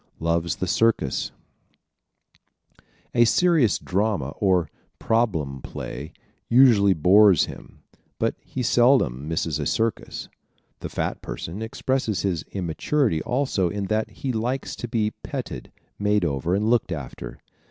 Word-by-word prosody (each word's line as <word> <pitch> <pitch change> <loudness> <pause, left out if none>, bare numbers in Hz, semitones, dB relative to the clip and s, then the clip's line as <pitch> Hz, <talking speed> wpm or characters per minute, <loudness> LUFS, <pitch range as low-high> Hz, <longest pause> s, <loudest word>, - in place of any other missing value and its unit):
Loves 85 0 0
the - - -3
Circus 115 - +1 1.4
¶ - - -27 0.3
A 120 - +5
serious 150 - +3
drama 95 -7 -1
or 90 -5 +2 0.3
"problem 80 - 0
play" 70 +5 -7 0.4
usually 115 -6 +6
bores 95 +2 +6
him - - -12 0.3
but - - 0
he 130 - -4
seldom 120 - +3
misses 80 -2 -1
a - - -1
circus. 115 -3 -2 0.5
The - - -6
fat - - -3
person 90 +6 -6
expresses 115 -1 -1
his 90 -5 0
immaturity 95 - 0
also 125 -8 0
in 100 +1 -3
that 110 0 0
he 130 -2 -4
likes 120 +4 -2
to 120 - -5
be 110 -2 0
petted, - - -6 0.3
made 105 -2 +2
over 80 +4 0
and 105 +2 0
looked 115 -5 +2
after. 70 -7 -6
105 Hz, 130 wpm, -24 LUFS, 85-120 Hz, 1.4 s, usually